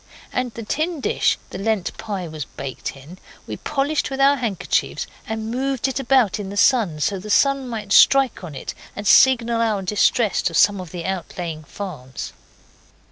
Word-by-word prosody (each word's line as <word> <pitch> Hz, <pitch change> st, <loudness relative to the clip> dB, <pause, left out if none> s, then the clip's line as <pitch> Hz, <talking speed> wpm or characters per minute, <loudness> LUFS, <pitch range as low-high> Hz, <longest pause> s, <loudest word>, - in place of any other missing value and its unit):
And 250 Hz, -1 st, -1 dB
the 230 Hz, -, -6 dB
tin 310 Hz, +8 st, -2 dB
dish -, -, +1 dB
the -, -, -6 dB
Lent 210 Hz, -2 st, -1 dB
pie 200 Hz, -5 st, -4 dB
was 155 Hz, -2 st, -6 dB
baked 135 Hz, 0 st, -6 dB
in 155 Hz, +7 st, -13 dB, 0.3 s
we -, -, -6 dB
polished 290 Hz, +1 st, -1 dB
with 270 Hz, 0 st, -5 dB
our 280 Hz, +1 st, +5 dB
handkerchiefs, 225 Hz, -8 st, -1 dB, 0.2 s
and 220 Hz, 0 st, -4 dB
moved 265 Hz, +1 st, -1 dB
it 265 Hz, 0 st, -2 dB
about 245 Hz, -6 st, +2 dB
in 200 Hz, -2 st, -5 dB
the 200 Hz, -, -6 dB
sun 205 Hz, -9 st, +3 dB
so 195 Hz, +6 st, 0 dB
that -, -, -8 dB
the 210 Hz, -, -9 dB
sun 275 Hz, +4 st, +3 dB
might 215 Hz, -4 st, -6 dB
strike 270 Hz, -7 st, +5 dB
on 160 Hz, -5 st, -7 dB
it 130 Hz, -, -6 dB, 0.2 s
and 205 Hz, -, -6 dB
signal 235 Hz, 0 st, +5 dB
our 215 Hz, -4 st, 0 dB
distress 210 Hz, +3 st, +2 dB
to 165 Hz, -, -1 dB
some 200 Hz, +2 st, +4 dB
of 180 Hz, -, -9 dB
the 170 Hz, -1 st, -6 dB
outlying 175 Hz, -4 st, -4 dB
farms. 145 Hz, -10 st, -7 dB
210 Hz, 185 wpm, -21 LUFS, 180-255 Hz, 0.3 s, our